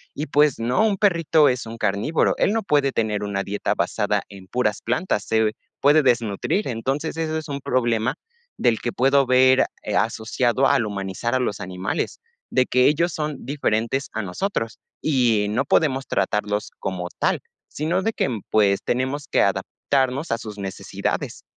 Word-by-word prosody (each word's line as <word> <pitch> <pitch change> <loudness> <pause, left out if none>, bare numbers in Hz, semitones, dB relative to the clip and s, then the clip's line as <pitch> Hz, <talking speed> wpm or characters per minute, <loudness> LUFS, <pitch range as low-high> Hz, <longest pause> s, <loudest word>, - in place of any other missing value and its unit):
y 150 - -3
pues 145 +1 +3
no, 120 - +1
un 210 -3 +2
perrito 165 -6 +4
es 125 -2 0
un 115 - -7
carnívoro, 105 +9 +1
él 205 - +2
no 225 - 0
puede 145 -6 +2
tener 110 -4 -1
una 100 -1 -2
dieta 100 +1 -2
basada - - 0
en 95 -2 -12
puras 105 -2 -1
plantas, 120 - -1
se 110 -1 +2 0.3
puede 145 +2 +5
desnutrir. 120 - +1
Entonces, 135 +7 -2
ese 160 -1 -1
es 155 - -5
un 140 - -3
problema 120 -2 0 0.4
del 115 -2 +2
que 120 - -2
puedo 135 +2 +3
ver 130 +1 +5 0.2
eh, - - -2
asociado 120 +3 +1
al 115 - +3
humanizar 100 +4 -3
a - - +2
los 110 -5 -2
animales, 95 +1 -3 0.3
de 130 - +2
que 125 0 +3
ellos 170 +3 +2
son 150 -3 -4
diferentes 135 -1 -1
a 110 - -2
nosotros, 115 - -3 0.2
y 120 -8 +2
no 130 +6 0
podemos 135 -3 +2
tratarlos 105 +1 -1
como 90 -2 -4
tal, - - +1 0.3
sino 165 +5 -1
de 225 +4 0
que, - - 0
mm 115 -6 -3
pues, 100 -2 +3
tenemos 130 +4 -1
que - - +2
adaptarnos 135 +1 -1
a 115 - 0
sus 105 -3 -8
necesidades. 95 -2 -4
125 Hz, 170 wpm, -23 LUFS, 110-145 Hz, 0.4 s, puede